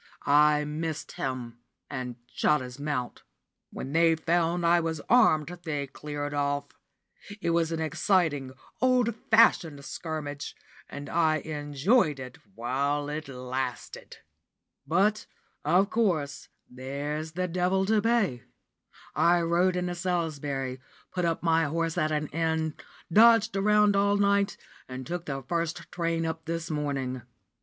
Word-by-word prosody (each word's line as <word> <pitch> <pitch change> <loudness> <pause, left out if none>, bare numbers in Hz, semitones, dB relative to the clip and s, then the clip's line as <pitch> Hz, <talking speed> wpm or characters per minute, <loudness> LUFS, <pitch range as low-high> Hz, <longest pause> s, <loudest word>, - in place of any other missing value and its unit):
I 150 +1 +4
missed 155 +1 -4
him, 125 -3 -5 0.3
and 130 -3 -5 0.2
shot 150 - +3
his 125 +1 -8
mount. 145 -4 -3 0.5
When 135 - -6
they 165 0 +4
found 170 +1 0
I 170 +1 +5
was 160 -2 -2
armed, 175 -11 +4
they 145 -4 -2
cleared 145 +3 -5
off. 145 0 -1 0.7
It 170 - 0
was 165 -1 +1
an 165 - -2
exciting, 160 -4 +1 0.3
old 250 -2 +3 0.2
fashioned 165 -10 +4
scrimmage, 150 -3 -5 0.3
and 145 0 -7
I 160 -2 +2
enjoyed 150 - +1
it 125 -1 -9 0.2
while 140 +5 -1
it 155 +1 -4
lasted. 130 -1 -5 0.7
But 205 +5 +2 0.4
of 195 +3 +3
course, 170 -11 0 0.2
there's 145 +5 -5
the 180 +2 -1
devil 180 +2 +1
to 215 +1 +2
pay. 210 - +1 0.7
I 175 0 +4
rode 175 +2 +2
into 180 0 -1
Salisbury, 150 -7 -2 0.3
put 180 -1 0
up 165 0 -1
my 165 -1 +3
horse 165 +2 -1
at 155 -3 0
an 150 0 0
inn, 160 -1 -1 0.4
dodged 225 -1 +6
around 210 +1 +4
all 200 +1 +3
night, 200 0 +2 0.3
and 130 0 -7
took 175 +3 -5
the 135 -2 -4
first 170 +3 -3
train 165 -1 -1
up 160 0 -4
this 165 0 -3
morning. 135 -4 -2
160 Hz, 130 wpm, -28 LUFS, 145-175 Hz, 0.7 s, dodged